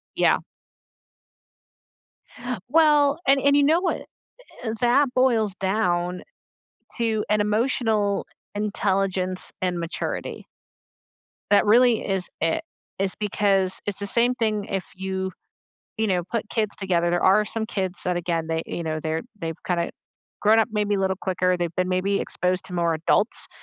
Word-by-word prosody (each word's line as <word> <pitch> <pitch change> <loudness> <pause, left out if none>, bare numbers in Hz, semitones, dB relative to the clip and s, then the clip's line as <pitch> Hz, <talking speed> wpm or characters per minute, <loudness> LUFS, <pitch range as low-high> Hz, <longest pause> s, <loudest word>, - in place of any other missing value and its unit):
Yeah. - - +3 2.3
Well, 295 -1 +4
and 275 0 +5
and 280 +1 +4
you 285 - +5
know 320 +5 +4
what, 365 - -1 0.6
eh, 225 -2 -2
that 250 +2 +3
boils 235 -6 +2
down 180 -2 0 0.7
to 225 -2 0
an 210 0 +3
emotional 215 -1 +1 0.3
intelligence 195 -3 -1
and 180 -1 -1
maturity. 170 0 -4 1.1
That 205 - +5
really 235 +2 +4
is 190 -2 -1
it. 165 0 +1 0.4
It's 195 -1 0
because 195 -2 +1
it's 205 -1 -3
the 200 - -2
same 240 +4 +2
thing 215 -4 0
if 195 -3 -3
you, 190 0 -3 0.7
you 220 - 0
know, 180 -3 +1
put 225 -2 -2
kids 215 -3 -1
together, 175 -3 +1
there 175 - +1
are 200 +3 +5
some 220 +1 -3
kids 190 -4 -3
that, 180 -1 0
again, 170 -2 -1
they, 160 0 -1
you 170 - -4
know, 155 -1 -3
they're 160 +1 -2 0.2
they've 165 -2 -4
kinda 170 -2 0 0.5
grown 215 +2 +5
up 225 - +3
maybe 210 -1 +1
a 200 - 0
little 190 0 0
quicker, 185 -1 +1
they've 175 -1 -3
been 185 0 +1
maybe 190 +2 +1
exposed 180 +1 -1
to 180 - -9
more 170 -1 +1
adults 170 +7 +1
200 Hz, 150 wpm, -24 LUFS, 180-220 Hz, 2.3 s, and